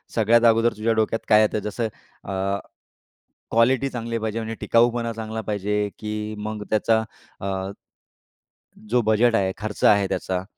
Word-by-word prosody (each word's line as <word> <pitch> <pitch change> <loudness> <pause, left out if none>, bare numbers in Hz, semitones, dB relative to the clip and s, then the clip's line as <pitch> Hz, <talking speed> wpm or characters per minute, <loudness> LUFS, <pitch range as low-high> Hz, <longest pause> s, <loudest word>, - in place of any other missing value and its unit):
सगळ्यात 115 +1 +4
अगोदर 115 +1 +4
तुझ्या 115 +1 +1
डोक्यात 110 0 +1
काय 105 -1 +7
येतं? 110 0 +1
जसं 105 +3 -3 0.4
अ, - - -7 1.2
क्वालिटी 125 +4 +3
चांगली 115 -2 -3
पाहिजे 110 0 -3
म्हणजे 115 0 -4
टिकाऊपणा 115 0 +2
चांगला 110 0 -5
पाहिजे 105 0 -1
की 105 0 -4
मग 105 0 -5
त्याचा 110 +1 +3 0.4
अ, 95 0 -3 1.2
जो 120 +2 +3
बजेट 110 +2 +3
आहे, 95 -3 +1
खर्च 105 -1 -6
आहे 100 -2 +5
त्याचा? 95 -1 -2
110 Hz, 140 wpm, -23 LUFS, 105-115 Hz, 1.2 s, काय